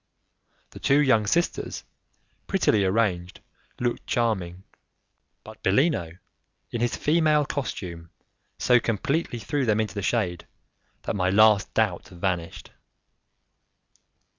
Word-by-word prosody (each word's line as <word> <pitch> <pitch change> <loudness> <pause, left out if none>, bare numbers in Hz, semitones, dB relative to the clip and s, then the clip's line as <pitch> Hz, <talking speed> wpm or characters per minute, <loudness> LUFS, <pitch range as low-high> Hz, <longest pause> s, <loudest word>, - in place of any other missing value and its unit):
The - - -11
two 140 +2 +3
young 115 -7 +3
sisters, 170 +10 -1 0.6
prettily 110 - +2
arranged, 95 -3 0 0.4
looked 120 -1 -2
charming, 95 -6 -1 0.8
but - - -13
Bellino, 95 - +1 0.5
in 120 - -3
his 120 - 0
female 155 -1 +2
costume, 90 - -5 0.5
so 125 0 +4
completely 130 - -1
threw 125 +7 -2
them 110 -3 +1
into 110 -1 -1
the 100 - -4
shade, 95 -4 -1 0.6
that - - -3
my 90 -2 +1
last 105 +1 +4
doubt 105 -6 0
vanished. 90 -2 -4
110 Hz, 110 wpm, -25 LUFS, 95-130 Hz, 0.8 s, so